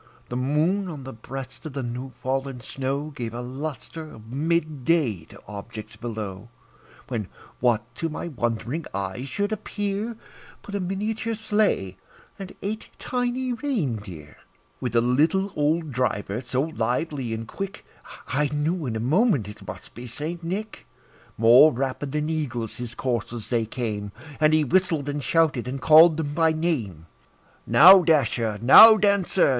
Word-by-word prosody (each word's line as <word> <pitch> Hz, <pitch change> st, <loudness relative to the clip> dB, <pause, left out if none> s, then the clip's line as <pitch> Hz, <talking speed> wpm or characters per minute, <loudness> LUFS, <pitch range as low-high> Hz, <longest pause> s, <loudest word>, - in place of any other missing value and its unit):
The 120 Hz, -, -4 dB
moon, 155 Hz, +10 st, +1 dB
on 150 Hz, -5 st, -7 dB
the 135 Hz, -, -8 dB
breast 130 Hz, +4 st, -8 dB
of 150 Hz, -, -9 dB
the 135 Hz, -1 st, -3 dB
new 125 Hz, +2 st, -5 dB
fallen 135 Hz, 0 st, -2 dB
snow, 135 Hz, +4 st, -4 dB
Gave 120 Hz, -4 st, -5 dB
a 120 Hz, -, -4 dB
lustre 150 Hz, +5 st, -6 dB
of 110 Hz, +1 st, -13 dB
mid 155 Hz, 0 st, -1 dB
day 125 Hz, -, +1 dB
to -, -, -15 dB
objects 105 Hz, +1 st, -8 dB
below; 110 Hz, -2 st, -6 dB, 0.6 s
When, 110 Hz, -6 st, -3 dB, 0.3 s
what 120 Hz, -3 st, +2 dB
to 165 Hz, -, -2 dB
my 160 Hz, -, -5 dB
wondering 120 Hz, +3 st, -2 dB
eyes 100 Hz, +7 st, -4 dB
should 205 Hz, +9 st, -2 dB
appear, 205 Hz, +1 st, -3 dB, 0.5 s
But 200 Hz, -, -10 dB
a 200 Hz, -, -1 dB
miniature 215 Hz, +5 st, -2 dB
sleigh, 210 Hz, -, 0 dB, 0.4 s
and 195 Hz, -1 st, -8 dB
eight 215 Hz, +3 st, -4 dB
tiny 250 Hz, 0 st, -2 dB
rein 225 Hz, -, -1 dB
deer, 85 Hz, -8 st, -11 dB, 0.4 s
With 125 Hz, -2 st, -3 dB
a 115 Hz, -, +5 dB
little 155 Hz, +11 st, +2 dB
old 155 Hz, +1 st, 0 dB
driver, 115 Hz, -4 st, -1 dB
so 130 Hz, +1 st, -1 dB
lively 135 Hz, -2 st, -2 dB
and 115 Hz, 0 st, -4 dB
quick, 195 Hz, +6 st, -6 dB, 0.4 s
I 145 Hz, +2 st, +1 dB
knew 150 Hz, +2 st, -1 dB
in 115 Hz, -, -3 dB
a -, -, -2 dB
moment 145 Hz, -, +2 dB
it 105 Hz, -1 st, -11 dB
must 95 Hz, -, -9 dB
be 125 Hz, +1 st, -9 dB
St. 160 Hz, +8 st, -5 dB
Nick. 200 Hz, +6 st, -5 dB, 0.5 s
More 120 Hz, +7 st, +7 dB
rapid 135 Hz, +2 st, -3 dB
than 150 Hz, +1 st, -1 dB
eagles 130 Hz, -8 st, -3 dB
his 120 Hz, -1 st, -7 dB
coursers 120 Hz, -2 st, -3 dB
they 115 Hz, -2 st, +1 dB
came, 105 Hz, -4 st, -4 dB, 0.3 s
And 155 Hz, 0 st, +4 dB
he 155 Hz, 0 st, +4 dB
whistled, 165 Hz, -2 st, +1 dB
and 145 Hz, 0 st, -3 dB
shouted, 155 Hz, -7 st, +1 dB
and 135 Hz, +2 st, -4 dB
called 160 Hz, +3 st, +7 dB
them 145 Hz, -3 st, -3 dB
by 160 Hz, 0 st, +3 dB
name; 125 Hz, -, -2 dB, 0.6 s
"Now, 185 Hz, +5 st, +9 dB
Dasher! 120 Hz, -9 st, +1 dB
now, 220 Hz, -, +10 dB
Dancer! 200 Hz, -4 st, +3 dB
140 Hz, 155 wpm, -24 LUFS, 120-170 Hz, 0.6 s, now